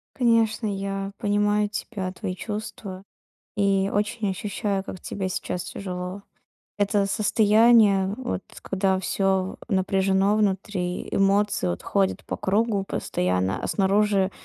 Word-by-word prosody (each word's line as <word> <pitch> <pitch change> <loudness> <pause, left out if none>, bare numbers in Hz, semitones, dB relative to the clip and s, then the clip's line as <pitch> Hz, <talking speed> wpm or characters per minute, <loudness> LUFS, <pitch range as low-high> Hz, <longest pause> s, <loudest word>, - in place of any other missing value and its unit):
Конечно, 230 -2 +2
я 195 0 -3
понимаю 205 0 +1
тебя, 200 -2 -4
твои 185 -2 -4
чувства. 205 -2 -6 0.5
И 195 -1 +2
очень 210 0 0
ощущаю, 195 0 -2
как 185 -2 -8
тебе 190 -2 -4
сейчас 180 -1 -3
тяжело. 185 +1 -6 0.6
Это 205 0 +2
состояние, 210 -1 +4
вот, 245 -7 -3 0.2
когда 190 -1 0
всё 190 0 0
в - - -3
напряжено 195 +1 +2
внутри, 190 -3 -1
эмоции, 200 - +2
вот, 85 - -3
ходят 195 -1 0
по - - -4
кругу 205 0 +1
постоянно, 90 - -1
а - - -1
снаружи 195 -1 +2
195 Hz, 120 wpm, -25 LUFS, 190-210 Hz, 0.6 s, состояние